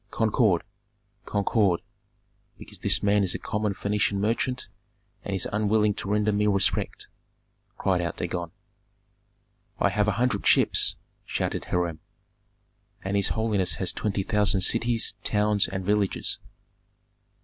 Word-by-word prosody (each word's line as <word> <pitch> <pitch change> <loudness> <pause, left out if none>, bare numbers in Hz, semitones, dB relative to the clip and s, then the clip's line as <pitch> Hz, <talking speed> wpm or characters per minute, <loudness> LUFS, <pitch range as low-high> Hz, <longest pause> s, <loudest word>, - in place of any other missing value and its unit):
"Concord! 110 -5 +2 0.6
concord, 100 -3 +1 0.8
because - - -11
this - - +2
man 100 0 +3
is 90 - 0
a - - -1
common 105 -1 -2
Phœnician 100 0 0
merchant, 115 +5 -1 0.6
and 100 - -3
is 95 - -1
unwilling 105 0 +2
to 95 - -6
render 105 +1 +2
me 105 +1 +1
respect," 100 -1 0 0.7
cried 95 -2 +1
out 85 - -3
Dagon. 85 -1 -3 1.3
"I - - +2
have 105 0 +1
a 105 - +2
hundred 110 -1 0
ships!" - - +4 0.3
shouted - - -3
Hiram. 85 -3 -1 1.0
"And 95 +1 -2
his 100 -1 +2
holiness 110 -5 +1
has 95 - 0
twenty 100 -2 -2
thousand 105 -1 +2
cities, 115 +3 +2
towns, 105 -1 +2
and 95 -1 -5
villages." 105 -1 0
105 Hz, 125 wpm, -26 LUFS, 95-105 Hz, 1.3 s, ships